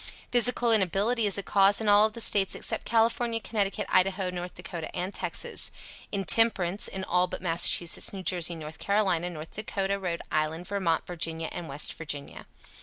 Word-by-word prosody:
Physical 245 0 +3
inability 215 +3 +2
is 200 - +1
a 200 - -4
cause 195 +1 +3
in 220 - -3
all 205 +1 +5
the 220 - -10
States 195 -3 +2
except - - -2
California, 230 0 +1
Connecticut, 205 -3 -2
Idaho, 185 0 +1
North 180 0 -6
Dakota 170 -2 -7
and 185 +3 -3
Texas. - - -2 0.4
Intemperance, 200 -1 +4
in 190 0 -5
all 180 0 +1
but - - -6
Massachusetts, 170 -1 +2
New 195 -2 -7
Jersey, 175 -2 0
North 155 -1 -9
Carolina, 190 -4 0
North 160 -2 -9
Dakotah, 200 -2 -2
Rhode 175 -3 -4
Island, 155 +3 -1
Vermont, 190 -5 -1
Virginia 165 -2 -1
and 170 - -7
West 140 +2 -1
Virginia. 145 -3 -7
190 Hz, 165 wpm, -27 LUFS, 170-205 Hz, 0.4 s, all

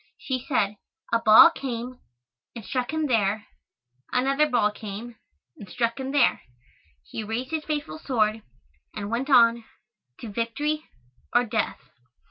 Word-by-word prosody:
She 255 -2 -4
said, 210 -6 0 0.4
"A 230 - +4
ball 230 +10 +8
came 250 -3 -5 0.6
and 230 -4 -8
struck 255 -2 -2
him 315 0 -1
there 215 -4 +1 0.7
another 275 +4 +2
ball 230 -5 +2
came 215 +3 -8 0.4
and 200 - -10
struck 235 +3 -1
him 265 0 -4
there 285 - +3 0.6
he 220 - -6
raised 230 +5 -4
his 315 -1 -2
faithful 305 +1 -4
sword 220 -7 0 0.5
and 205 0 -5
went 250 +5 -2
on 235 -3 +5 0.6
to 230 - -7
victory 295 +8 -2 0.5
or 240 - +5
death." 220 -1 -1
240 Hz, 135 wpm, -25 LUFS, 220-275 Hz, 0.7 s, ball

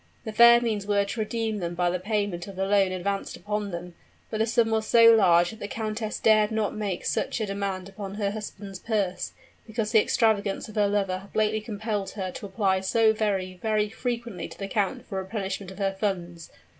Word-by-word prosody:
The 220 - -3
fair 235 +2 +8
means 215 -4 -2
were 200 -1 +2
to 210 +3 -5
redeem 220 0 -1
them 175 -1 -3
by 175 0 +1
the 180 - -1
payment 205 -3 -2
of 195 - -9
the 190 +1 -1
loan 195 -1 +3
advanced 195 +2 -3
upon 210 0 -3
them; 175 -1 -6 0.4
but 215 - -2
the 220 - +2
sum 225 0 +2
was 220 -1 0
so 230 -1 +8
large 175 -5 +5
that 220 - -12
the 205 - -5
countess 215 0 -3
dared 215 -1 +4
not 220 -2 -1
make 205 -4 -3
such - - -1
a 220 - 0
demand 195 -2 -3
upon 195 0 -7
her 205 -1 -1
husband's 205 -2 -7
purse, 205 -5 -2 0.3
because 220 -1 -2
the 220 - +6
extravagances 210 -4 +1
of 215 - -11
her 205 -1 +3
lover 195 -2 0
had 195 +1 -16
lately 215 0 +1
compelled 210 -2 -3
her 190 -3 -4
to 205 - -7
apply 190 -1 +1
so 220 +3 +3
very, 190 -4 -1
very 215 -1 +1
frequently 235 -3 -4
to - - -12
the 195 - -4
count 200 0 -1
for 190 - -4
a - - -2
replenishment 190 -1 -4
of 190 - -11
her 195 -1 0
funds. 175 -5 -3
205 Hz, 215 wpm, -26 LUFS, 190-220 Hz, 0.4 s, fair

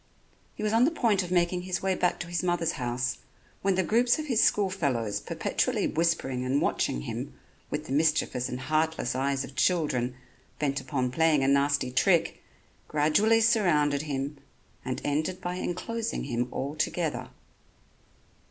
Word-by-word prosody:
He - - -6
was 215 0 0
on 230 +2 +5
the - - +4
point 230 - +1
of 180 - -5
making 180 0 +1
his 185 0 -3
way 190 0 +2
back 180 -1 0
to 175 - -5
his 175 0 -1
mother's 175 -2 0
house 125 -2 -2 0.4
when 195 -1 +2
the 190 - +2
groups 235 +7 +3
of 310 - -4
his 245 -6 +2
school 200 -2 +3
fellows 125 - -1
perpetually - - -1
whispering 155 -6 0
and 130 +2 +1
watching - - 0
him - - -5 0.3
with - - -3
the - - -8
mischievous 150 -4 +1
and 125 +1 -5
heartless 155 -1 0
eyes 135 +1 0
of - - -9
children 130 -9 +1 0.4
bent 140 -2 -1
upon 130 -1 -2
playing 155 0 +3
a - - +2
nasty 140 -1 +2
trick, 170 +6 +2 0.5
gradually 180 +10 +3
surrounded 170 -11 +3
him 140 -1 -4 0.4
and 130 0 -3
ended 155 +6 -1
by 180 0 -4
enclosing 230 +6 -3
him 120 -2 -1
altogether. 155 +3 -2
155 Hz, 160 wpm, -28 LUFS, 135-185 Hz, 0.5 s, on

